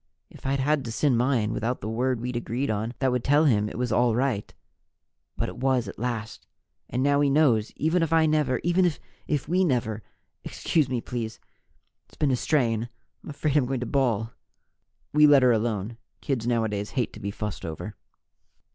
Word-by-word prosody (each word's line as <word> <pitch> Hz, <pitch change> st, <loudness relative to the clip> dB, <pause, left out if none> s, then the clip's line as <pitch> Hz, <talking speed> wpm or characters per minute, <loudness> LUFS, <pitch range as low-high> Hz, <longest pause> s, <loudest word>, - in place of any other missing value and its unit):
If -, -, -9 dB
I'd 135 Hz, +1 st, +1 dB
had 145 Hz, +1 st, +1 dB
to 115 Hz, -, -4 dB
send 125 Hz, 0 st, +2 dB
mine 120 Hz, -4 st, +1 dB
without 120 Hz, +3 st, -2 dB
the -, -, -6 dB
word 125 Hz, +2 st, 0 dB
we'd 125 Hz, +1 st, -4 dB
agreed 120 Hz, +2 st, -2 dB
on 110 Hz, +3 st, -3 dB
that 130 Hz, 0 st, +1 dB
would 125 Hz, -1 st, -1 dB
tell 145 Hz, +3 st, +4 dB
him 105 Hz, -6 st, +2 dB
it -, -, -8 dB
was 125 Hz, -1 st, -1 dB
all 120 Hz, 0 st, +3 dB
right 125 Hz, -5 st, -1 dB, 0.9 s
But -, -, -1 dB
it -, -, -8 dB
was, 130 Hz, -3 st, +1 dB
at 100 Hz, -, -8 dB
last! 115 Hz, -2 st, -4 dB, 0.4 s
And 125 Hz, -, -1 dB
now 140 Hz, 0 st, +3 dB
he 145 Hz, -, +3 dB
knows, 130 Hz, -7 st, +3 dB
even 160 Hz, +4 st, +1 dB
if 165 Hz, -1 st, 0 dB
I 160 Hz, -1 st, +4 dB
never 150 Hz, -5 st, +1 dB
even 175 Hz, +1 st, +3 dB, 0.4 s
if 150 Hz, -3 st, -1 dB
we 180 Hz, +4 st, +2 dB
never 120 Hz, -, 0 dB, 0.4 s
Excuse 150 Hz, -5 st, 0 dB
me, 125 Hz, -2 st, -1 dB
please, 115 Hz, -3 st, -5 dB, 0.7 s
it's -, -, -22 dB
been 145 Hz, -3 st, +2 dB
a -, -, +3 dB
strain. 120 Hz, -4 st, 0 dB, 0.3 s
I'm -, -, -10 dB
afraid 145 Hz, 0 st, -2 dB
I'm 140 Hz, -4 st, +3 dB
going 130 Hz, -1 st, -2 dB
to -, -, -2 dB
bawl." 115 Hz, -4 st, 0 dB, 0.8 s
We 150 Hz, 0 st, +7 dB
let 145 Hz, -3 st, +6 dB
her 125 Hz, -, +6 dB
alone. 110 Hz, -1 st, -1 dB, 0.2 s
Kids 125 Hz, -5 st, -2 dB
nowadays 110 Hz, -4 st, 0 dB
hate 125 Hz, -, 0 dB
to -, -, -10 dB
be 100 Hz, -1 st, -4 dB
fussed 105 Hz, -1 st, -5 dB
over. 80 Hz, -1 st, -6 dB
125 Hz, 195 wpm, -26 LUFS, 115-140 Hz, 0.9 s, We